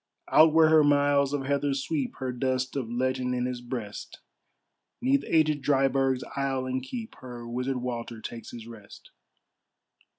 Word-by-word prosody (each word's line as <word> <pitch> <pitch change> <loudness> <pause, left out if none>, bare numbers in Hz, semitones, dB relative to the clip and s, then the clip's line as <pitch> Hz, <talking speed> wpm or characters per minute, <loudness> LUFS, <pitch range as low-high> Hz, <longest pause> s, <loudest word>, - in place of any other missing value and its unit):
Out 155 +1 +7
where 160 0 +5
her 155 -1 +6
miles 145 -1 +3
of 145 -2 -2
heather 140 0 0
sweep, 140 0 -2
Her 130 -1 -3
dust 130 +1 -1
of 130 -5 -3
legend 125 +1 -1
in 125 0 -1
his 125 -1 -4
breast, 120 -4 -6 0.8
'Neath 270 +3 +2
agèd 155 -3 +2
Dryburgh's 135 -2 +2
aisle 135 -1 -1
and 130 0 -2
keep, 225 - -7
Her 120 -2 -9
Wizard 125 +2 -2
Walter 120 -2 -5
takes 115 +1 -8
his 115 -2 -9
rest. 115 -3 -13
130 Hz, 155 wpm, -27 LUFS, 125-145 Hz, 0.8 s, Out